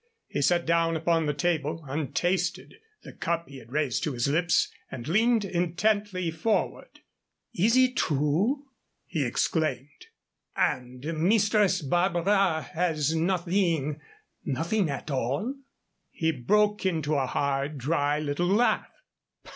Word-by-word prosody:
He 145 Hz, -, -3 dB
set 175 Hz, +4 st, +2 dB
down 165 Hz, 0 st, +2 dB
upon 165 Hz, 0 st, +1 dB
the 150 Hz, -, +1 dB
table, 160 Hz, -2 st, -1 dB
untasted, 175 Hz, +6 st, -1 dB, 0.3 s
the -, -, -11 dB
cup 170 Hz, 0 st, -2 dB
he 135 Hz, -1 st, -10 dB
had 115 Hz, -1 st, -16 dB
raised 145 Hz, -4 st, 0 dB
to 150 Hz, -, -1 dB
his 120 Hz, 0 st, 0 dB
lips, 165 Hz, +4 st, +2 dB, 0.2 s
and 125 Hz, -2 st, -7 dB
leaned 220 Hz, +5 st, +3 dB
intently 185 Hz, +1 st, 0 dB
forward. 205 Hz, +7 st, -2 dB, 0.5 s
"Is 225 Hz, +8 st, +3 dB
it 255 Hz, 0 st, +3 dB
true?" 160 Hz, -, +1 dB, 0.4 s
he 160 Hz, -5 st, -2 dB
exclaimed; 140 Hz, +1 st, -2 dB, 0.5 s
"and 125 Hz, 0 st, -1 dB
Mistress 190 Hz, +3 st, +2 dB
Barbara 175 Hz, +2 st, +2 dB
has 160 Hz, -3 st, 0 dB
nothing 170 Hz, -4 st, 0 dB, 0.4 s
nothing 165 Hz, -, 0 dB
at 140 Hz, +2 st, -5 dB
all?" 140 Hz, -, -1 dB, 0.6 s
He 160 Hz, -1 st, 0 dB
broke 210 Hz, -, +1 dB
into 160 Hz, -5 st, 0 dB
a 135 Hz, -3 st, +1 dB
hard, 140 Hz, +2 st, -1 dB
dry 145 Hz, +2 st, 0 dB
little 155 Hz, +3 st, -1 dB
laugh. 210 Hz, +6 st, +2 dB
165 Hz, 125 wpm, -27 LUFS, 145-185 Hz, 0.6 s, leaned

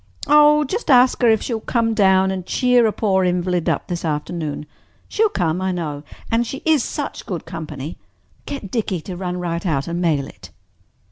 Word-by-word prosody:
"Oh, 300 Hz, 0 st, +6 dB
just 380 Hz, -, -4 dB
ask 255 Hz, -1 st, +5 dB
her 240 Hz, -, +5 dB
if 220 Hz, -1 st, +3 dB
she 245 Hz, -, -3 dB
will 220 Hz, -, -3 dB
come 230 Hz, -1 st, 0 dB
down 190 Hz, -3 st, +3 dB
and 190 Hz, -1 st, -4 dB
cheer 250 Hz, +3 st, +3 dB
a -, -, +1 dB
poor 195 Hz, -3 st, +1 dB
invalid 180 Hz, -1 st, 0 dB
up -, -, -1 dB
this 175 Hz, -1 st, -4 dB
afternoon. 150 Hz, -1 st, -3 dB, 0.4 s
She'll 440 Hz, 0 st, +2 dB
come, 175 Hz, -, -1 dB
I 190 Hz, 0 st, 0 dB
know. 155 Hz, -5 st, -4 dB, 0.3 s
And 230 Hz, +1 st, +1 dB
she 270 Hz, -, -6 dB
is 310 Hz, -6 st, +3 dB
such 290 Hz, -2 st, -5 dB
good 180 Hz, -4 st, -4 dB
company. 155 Hz, -2 st, -7 dB, 0.5 s
Get 265 Hz, -9 st, -6 dB
Dickie 205 Hz, -7 st, -1 dB
to 180 Hz, +3 st, -7 dB
run 180 Hz, 0 st, -4 dB
right 170 Hz, -1 st, -3 dB
out 145 Hz, -7 st, -1 dB
and 170 Hz, +1 st, -3 dB
mail 155 Hz, -5 st, +1 dB
it." -, -, -13 dB
185 Hz, 195 wpm, -20 LUFS, 170-240 Hz, 0.5 s, Oh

